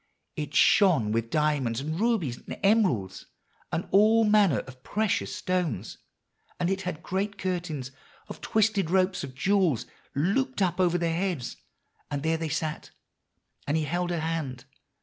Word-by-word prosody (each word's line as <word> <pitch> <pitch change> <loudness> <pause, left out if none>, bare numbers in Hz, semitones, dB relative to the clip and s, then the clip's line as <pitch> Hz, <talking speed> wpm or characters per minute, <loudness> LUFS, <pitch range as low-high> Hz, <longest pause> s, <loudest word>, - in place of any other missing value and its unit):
It 150 -1 -5
shone 160 - +5
with 115 +1 -1
diamonds 145 -6 +1
and 155 +4 -3
rubies 205 - +1
and - - -8
emeralds, 195 - +2 0.4
and 170 - -2
all 220 +3 +5
manner 210 -7 +4
of 130 -1 -14
precious 210 +7 -1
stones; 165 - -2 0.6
and 180 +1 +1
it 195 0 -1
had 175 -4 -5
great 200 +2 -2
curtains 170 -8 -3 0.4
of - - -9
twisted 215 -5 +1
ropes 185 0 +2
of 130 -2 -7
jewels 185 - +2 0.3
looped 210 - 0
up 180 -2 +1
over 175 -1 +3
their 170 -1 0
heads; 170 -8 -2 0.5
and 145 -1 -3
there 160 0 +1
they 160 -1 -3
sat, 155 0 -3 0.8
and 145 +2 +1
he 160 - 0
held 175 +4 -1
her 170 -2 -1
hand. 150 -6 -3
170 Hz, 150 wpm, -27 LUFS, 145-195 Hz, 0.8 s, shone